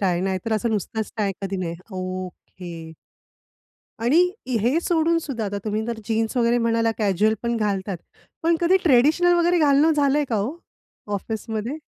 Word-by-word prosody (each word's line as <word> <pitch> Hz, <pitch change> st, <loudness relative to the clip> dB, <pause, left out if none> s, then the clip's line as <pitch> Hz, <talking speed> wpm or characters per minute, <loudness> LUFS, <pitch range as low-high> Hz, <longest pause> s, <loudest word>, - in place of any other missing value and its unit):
Tie, 180 Hz, -3 st, +1 dB
नाहीतर 190 Hz, +3 st, -2 dB
असं 220 Hz, +2 st, 0 dB
नुसतच 220 Hz, +1 st, -2 dB
tie 205 Hz, -3 st, 0 dB
कधी 195 Hz, 0 st, -3 dB
नाही 175 Hz, -3 st, -3 dB, 0.2 s
ओके. 185 Hz, -2 st, -7 dB, 1.1 s
आणि 250 Hz, +8 st, +4 dB, 0.4 s
हे 245 Hz, +9 st, +2 dB
सोडूनसुद्धा 325 Hz, -8 st, 0 dB
आता 205 Hz, 0 st, -3 dB
तुम्ही 215 Hz, 0 st, -2 dB
तर 235 Hz, -1 st, -3 dB
जीन्स 225 Hz, +2 st, -1 dB
वगैरे 240 Hz, 0 st, +3 dB
म्हणाला 230 Hz, -1 st, +1 dB
कॅज्युअल 210 Hz, +1 st, +2 dB
पण 235 Hz, 0 st, 0 dB
घालतात. 200 Hz, -3 st, -1 dB, 0.5 s
पण 335 Hz, +1 st, +3 dB
कधी 350 Hz, +2 st, +4 dB
ट्रेडिशनल 310 Hz, +5 st, +4 dB
वगैरे 345 Hz, +1 st, +3 dB
घालणं 300 Hz, +1 st, +4 dB
झालंय 290 Hz, 0 st, +3 dB
का 225 Hz, -, 0 dB
हो, 220 Hz, +10 st, -2 dB, 0.6 s
ऑफिसमध्ये? 220 Hz, +5 st, -4 dB
225 Hz, 145 wpm, -23 LUFS, 200-280 Hz, 1.1 s, आणि